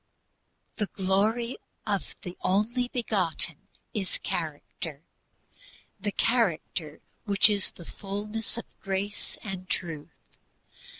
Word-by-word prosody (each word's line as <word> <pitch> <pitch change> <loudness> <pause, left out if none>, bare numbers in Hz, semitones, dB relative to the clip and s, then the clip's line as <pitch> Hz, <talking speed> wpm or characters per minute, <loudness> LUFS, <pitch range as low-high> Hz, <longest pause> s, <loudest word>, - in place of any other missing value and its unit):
"The 210 - +1
Glory 210 +7 +2 0.3
of 200 -3 -1
the 180 0 -5
Only 230 +6 +2
Begotten" 185 - +1 0.3
is 195 -4 0
character, 155 -1 -4 1.0
the 205 +1 0
character 175 -10 +1 0.2
which 200 -1 +9
is 200 -2 +4
"fullness 205 +6 -3
of 235 - -4 0.2
grace 195 +1 -2
and 190 -3 -5
truth." 165 -4 -5
195 Hz, 95 wpm, -29 LUFS, 175-215 Hz, 1.0 s, which